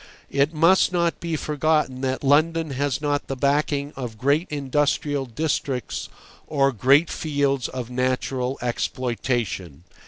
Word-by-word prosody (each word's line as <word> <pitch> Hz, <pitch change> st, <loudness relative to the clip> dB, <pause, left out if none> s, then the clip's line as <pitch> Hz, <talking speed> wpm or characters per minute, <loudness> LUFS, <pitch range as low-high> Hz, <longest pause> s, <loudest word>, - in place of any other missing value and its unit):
It 140 Hz, +2 st, +2 dB
must 170 Hz, +4 st, +4 dB
not 170 Hz, -2 st, 0 dB
be 170 Hz, -1 st, -2 dB
forgotten 150 Hz, -3 st, 0 dB
that 130 Hz, 0 st, -2 dB
London 155 Hz, +3 st, +3 dB
has 140 Hz, +1 st, -1 dB
not 145 Hz, -1 st, -1 dB
the 135 Hz, -, -3 dB
backing 140 Hz, +1 st, 0 dB
of 120 Hz, -4 st, -6 dB
great 140 Hz, -, +1 dB
industrial 145 Hz, 0 st, 0 dB
districts 135 Hz, -1 st, -2 dB, 0.4 s
or 140 Hz, -2 st, +2 dB
great 140 Hz, +7 st, +4 dB
fields 140 Hz, -4 st, 0 dB
of 125 Hz, -2 st, -6 dB
natural 130 Hz, +1 st, -1 dB
exploitation. 120 Hz, -, -2 dB
140 Hz, 125 wpm, -23 LUFS, 130-150 Hz, 0.4 s, must